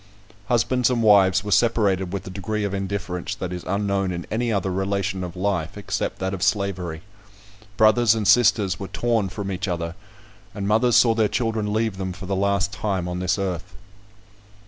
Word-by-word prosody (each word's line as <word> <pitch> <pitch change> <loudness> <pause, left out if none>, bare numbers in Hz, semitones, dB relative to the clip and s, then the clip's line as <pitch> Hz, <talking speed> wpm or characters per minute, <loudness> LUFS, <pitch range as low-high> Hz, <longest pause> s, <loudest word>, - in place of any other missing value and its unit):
Husbands 125 +1 +2
and 120 -2 0
wives 100 -2 +5
were 105 - -5
separated 100 -5 +2
with 95 -1 -4
a 95 - -7
degree 105 +3 -3
of 100 -1 -2
indifference 95 -2 -3
that 90 -1 -5
is 90 - -6
unknown 100 -1 0
in 85 -1 -5
any 115 +2 0
other 95 -2 0
relation 95 0 -1
of 90 0 -6
life, 95 -1 -2
except 105 - -3
that 95 +1 -3
of 95 - -5
slavery. 90 -6 -1 0.7
Brothers 110 +1 +5
and 110 -3 -1
sisters 105 -4 +4
were 95 - -5
torn 115 -4 0
from 100 +1 -5
each 95 +1 -3
other; 85 -2 -3 0.6
and 100 -1 -3
mothers 115 +3 +3
saw 115 -2 +6
their 110 -1 +2
children 110 -2 -1
leave 110 -2 -1
them 95 -1 -3
for 95 +1 -9
the 95 +1 -2
last 100 0 0
time 95 -4 -2
on 90 0 -3
this 90 +1 0
earth. 95 -1 -4
100 Hz, 185 wpm, -23 LUFS, 95-110 Hz, 0.7 s, saw